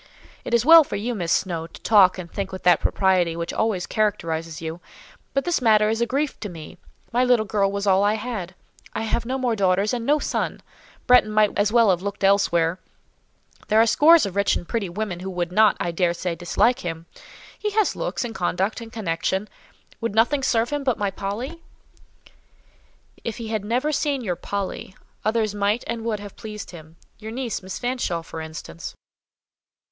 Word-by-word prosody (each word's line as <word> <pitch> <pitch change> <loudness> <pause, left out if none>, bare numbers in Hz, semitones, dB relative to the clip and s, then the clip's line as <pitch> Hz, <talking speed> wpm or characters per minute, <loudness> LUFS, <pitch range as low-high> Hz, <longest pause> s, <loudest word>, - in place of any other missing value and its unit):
"It - - 0
is 235 +1 +2
well 325 +1 +9
for 275 - -6
you, 225 +5 -2
Miss 175 -6 -3
Snowe, 165 -3 0
to - - -14
talk 200 -4 +5
and 180 -2 -6
think 195 -1 -4
with 185 - -7
that 175 -1 +5
propriety 185 -4 +2
which 170 0 -4
always 215 -5 0
characterizes 165 -7 -1
you; 165 +1 -6 0.6
but 275 - +1
this 350 -5 0
matter 215 -3 +4
is 225 +1 -1
a 235 - +2
grief 280 +3 -1
to 210 - -5
me; 160 -3 -10 0.3
my 245 +1 +3
little 245 -3 +3
girl 200 -1 +1
was 200 0 -3
all 195 0 +4
I 205 +1 +3
had: 210 -6 -5 0.4
I - - -2
have 230 +1 -1
no 260 +1 -1
more 250 -3 0
daughters 195 +1 +2
and 240 -2 -2
no 290 +5 +3
son; - - -2 0.4
Bretton 250 -3 +5
might 215 -1 +3
as 205 +1 +2
well 230 -3 +5
have 180 -1 0
looked 200 +1 -5
elsewhere; 185 -3 +3 0.9
there 215 +1 +4
are 225 - +6
scores 310 +6 +6
of 195 -2 -5
rich 200 0 +2
and 175 - -5
pretty 210 -3 -2
women 185 -1 -4
who 190 +1 -5
would 175 -1 -3
not, 215 +2 +4
I 175 - -1
daresay, 175 0 0
dislike 230 +9 +1
him: 165 -1 -5 0.5
he 425 - -1
has 420 -1 +1
looks, - - -3
and 230 - -5
conduct, 190 +4 -1
and 225 -1 -9
connection. 190 0 -2 0.5
Would 230 -2 -3
nothing 245 +6 +3
serve 235 -2 +1
him 290 -1 -2
but 255 -4 +1
my 200 -1 -1
Polly?" 235 - -5 1.6
"If 230 - -4
he 230 -2 -6
had 215 -2 -2
never 245 +8 0
seen 280 -3 -1
your 180 -5 -1
'Polly,' 195 0 -5 0.3
others 215 -1 0
might 205 +3 0
and 230 -1 -4
would 220 -3 -1
have 205 -1 -10
pleased 210 -1 -8
him—your 170 +6 -12
niece, 245 -2 -3
Miss 190 0 -6
Fanshawe, 245 -9 -2
for 160 -1 -7
instance." 155 - -8
210 Hz, 195 wpm, -23 LUFS, 180-235 Hz, 1.6 s, well